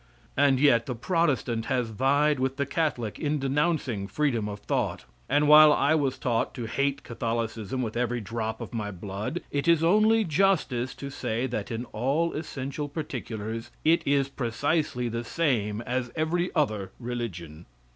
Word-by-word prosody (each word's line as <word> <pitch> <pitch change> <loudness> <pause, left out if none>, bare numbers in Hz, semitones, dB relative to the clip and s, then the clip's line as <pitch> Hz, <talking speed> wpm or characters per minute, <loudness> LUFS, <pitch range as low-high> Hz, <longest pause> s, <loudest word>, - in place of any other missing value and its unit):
And 140 -2 +4
yet 120 -5 +4
the 125 - -2
Protestant 125 - 0
has 125 -3 -1
vied 140 +5 +2
with 130 +1 -1
the 140 - 0
Catholic 140 -7 -2
in 150 -1 0
denouncing 135 -6 0
freedom 115 -2 0
of 100 0 -7
thought, - - -2 0.2
and 145 +2 +3
while 150 0 +9
I 150 +1 +3
was 140 -4 +1
taught 115 -2 -1
to 120 -4 -4
hate 140 +4 -1
Catholicism 115 0 -3
with 110 -1 -4
every 120 0 0
drop 110 +1 -4
of - - -7
my 105 -3 -2
blood, 100 - -5
it 140 +2 -1
is 165 -1 +4
only 215 +5 +4
justice 155 - +1
to 140 0 -7
say 115 -1 -2
that 115 -5 -3
in 115 +1 -4
all 140 +9 0
essential 145 -1 -4
particulars 115 -7 -5 0.2
it 165 +2 +5
is 140 -1 +3
precisely 135 +1 -1
the 115 0 -3
same 115 -8 0
as 125 0 -2
every 170 +3 0
other 105 - 0
religion. 90 -10 -6
130 Hz, 160 wpm, -27 LUFS, 115-150 Hz, 0.2 s, while